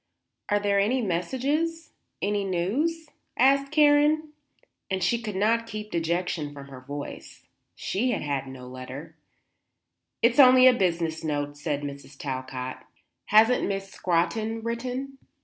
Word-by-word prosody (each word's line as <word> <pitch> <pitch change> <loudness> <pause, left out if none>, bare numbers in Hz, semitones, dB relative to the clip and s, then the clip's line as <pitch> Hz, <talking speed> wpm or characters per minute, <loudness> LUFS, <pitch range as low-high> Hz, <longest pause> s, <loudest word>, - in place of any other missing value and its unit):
"Are 205 - +3
there 200 -1 +1
any 225 +6 +2
messages? 270 - -1 0.3
any 205 0 0
news?" 265 - -1 0.3
asked 275 +2 +4
Karen, 300 0 +4 0.6
and 190 -2 -1
she 230 +6 +1
could 210 -4 -5
not 225 +4 +1
keep 215 -1 -7
dejection 170 -2 -1
from 140 -1 -10
her 130 -2 -10
voice. 145 +2 -8 0.3
She 235 +7 -1
had - - -1
had 140 -2 -2
no 130 -1 -9
letter. 130 +4 -9 1.1
"It's 235 +3 +4
only 255 -1 +8
a 255 - +8
business 170 -7 -1
note," 145 -2 -2
said 145 0 -3
Mrs. 140 0 -8
Talcott. 130 -2 -5 0.4
"Hasn't 225 +4 +4
Miss 195 -1 -4
Scrotton 215 +6 -1
written?" 255 +4 -4
200 Hz, 130 wpm, -26 LUFS, -, 1.1 s, only